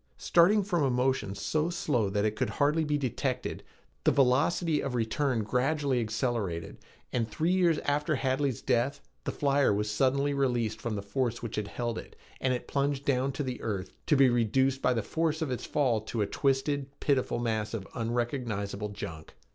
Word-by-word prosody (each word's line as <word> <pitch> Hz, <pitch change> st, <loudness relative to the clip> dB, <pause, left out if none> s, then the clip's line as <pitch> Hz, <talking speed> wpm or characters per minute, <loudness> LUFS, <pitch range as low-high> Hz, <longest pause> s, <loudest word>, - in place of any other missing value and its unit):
Starting 195 Hz, +5 st, +4 dB
from 180 Hz, -4 st, 0 dB
a 140 Hz, -, +3 dB
motion 125 Hz, -5 st, 0 dB
so 150 Hz, +11 st, 0 dB
slow 135 Hz, -, 0 dB
that 105 Hz, +1 st, 0 dB
it 110 Hz, 0 st, 0 dB
could -, -, -1 dB
hardly 150 Hz, +2 st, +2 dB
be 150 Hz, -1 st, +1 dB
detected, 130 Hz, -1 st, -2 dB, 0.4 s
the -, -, +5 dB
velocity 145 Hz, +4 st, +2 dB
of 130 Hz, -2 st, -3 dB
return 120 Hz, +1 st, 0 dB
gradually 130 Hz, +3 st, +1 dB
accelerated; 110 Hz, -7 st, -2 dB, 0.3 s
and 115 Hz, -3 st, 0 dB
three 160 Hz, +10 st, 0 dB
years 175 Hz, -4 st, +3 dB
after 150 Hz, +2 st, +1 dB
Hadley's 135 Hz, -2 st, 0 dB
death, 130 Hz, +4 st, +1 dB, 0.3 s
the -, -, -1 dB
flyer 140 Hz, -2 st, +2 dB
was 105 Hz, +1 st, 0 dB
suddenly 140 Hz, +5 st, +2 dB
released 120 Hz, -5 st, 0 dB
from 115 Hz, -2 st, -2 dB
the 100 Hz, -, -4 dB
force 120 Hz, +3 st, -2 dB
which 115 Hz, -, -4 dB
held 115 Hz, +3 st, -2 dB
it, -, -, -12 dB, 0.2 s
and 130 Hz, -, +1 dB
it 125 Hz, -, -2 dB
plunged 140 Hz, 0 st, -1 dB
to 135 Hz, +1 st, 0 dB
the 130 Hz, -2 st, -4 dB
earth, 100 Hz, -4 st, -3 dB
to 155 Hz, -, +4 dB
be 135 Hz, -1 st, +6 dB
reduced 130 Hz, +3 st, +2 dB
by 125 Hz, -, +3 dB
the 115 Hz, -, 0 dB
force 160 Hz, +5 st, 0 dB
of 155 Hz, -5 st, -2 dB
its 125 Hz, -, -3 dB
fall 125 Hz, -7 st, +1 dB
to 110 Hz, 0 st, -2 dB
a -, -, 0 dB
twisted, 135 Hz, +3 st, 0 dB
pitiful 135 Hz, -5 st, +1 dB
mass 110 Hz, -3 st, -1 dB
of 100 Hz, -3 st, -5 dB
unrecognizable 115 Hz, -4 st, -2 dB
junk. 85 Hz, -6 st, -8 dB
130 Hz, 180 wpm, -29 LUFS, 110-145 Hz, 0.4 s, be